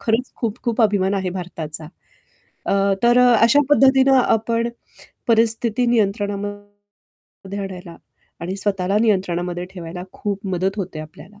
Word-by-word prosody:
खरंच 230 +3 -1
खूप-खूप 230 0 -1
अभिमान 200 -2 +2
आहे 190 -2 -1
भारताचा. 165 -4 -6 0.8
अ, - - +1 0.3
तर 240 +1 +5
अ, 245 - +6
अशा 245 +5 +6
पद्धतीने 270 -1 +5
आपण 230 +1 +1 0.6
परिस्थिती 230 +1 +2
नियंत्रणामध्ये 205 -2 -4
आणायला 180 -3 -8 0.4
आणि 180 +3 -4
स्वतःला 195 -1 -1
नियंत्रणामध्ये 180 -5 0
ठेवायला 175 0 -7
खूप 200 0 -4
मदत 190 +3 -1
होते 180 -6 -5
आपल्याला. 185 +7 -13
205 Hz, 115 wpm, -21 LUFS, 185-230 Hz, 0.8 s, अ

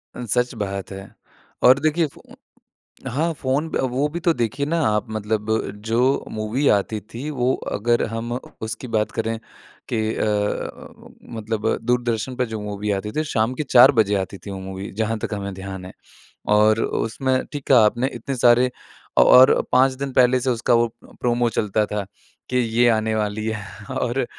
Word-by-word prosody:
अ, - - -6
सच 125 +3 0
बात 100 -1 -4
है। 95 0 -9 0.5
और 130 +2 +7
देखिए, 155 +2 +1
फो 140 - -17 0.9
हाँ, 155 +7 0
फोन 135 +5 -1
पे - - 0
अ, - - 0
वो 130 +3 0
भी 170 +3 -4
तो 170 0 +2
देखिए 135 +2 -1
ना 165 +3 0
आप 105 +2 0
मतलब 110 0 -2 0.4
जो 115 +1 +1 0.3
मूवी 110 +6 -1
आती 105 +2 -2
थी 130 +6 -5
वो 130 -1 +1 0.2
अगर 120 +3 +1
हम 115 +2 -4 0.3
उसकी 110 +3 -5
बात 105 0 +1
करें 115 0 -2 0.5
कि 115 - -1 0.2
अ - - -1
अ 105 -1 -2
उम, - - -17 0.2
मतलब 110 0 -3
दूरदर्शन 120 0 -1
पे 125 0 0
जो 110 - -3
मूवी 105 0 -3
आती 100 +2 -2
थी 155 - +2
शाम 110 +2 +1
के - - +1
चार 130 -1 +7
बजे 105 -1 +3
आती 95 +1 -9
थी 100 - -6
वो 95 - -6
मूवी 95 +1 -7
जहाँ 110 0 0
तक 105 - -4
हमें 100 -1 -4
ध्यान 95 -1 -7
है। 90 - -9 0.6
और 110 +1 +4
उसमें 130 +3 -1
ठीक 145 -2 -5
कहा 125 -5 +6
आपने 120 +4 +1
इतने 135 - -4
सारे 125 +1 +5 0.5
अ - - +8
और 130 - +8 0.2
5 130 +1 +4
दिन 140 -1 -2
पहले 125 0 +4
से 130 +1 -1
उसका 120 0 +1
वो 120 0 +4 0.2
प्रोमो 120 -1 -1
चलता 105 -1 0
था 105 -1 -3 0.4
कि 125 - 0
ये 120 0 +2
आने 110 -1 +1
वाली 105 0 -2
है 110 -1 -6
और 125 0 -1
115 Hz, 185 wpm, -22 LUFS, 105-130 Hz, 0.9 s, अ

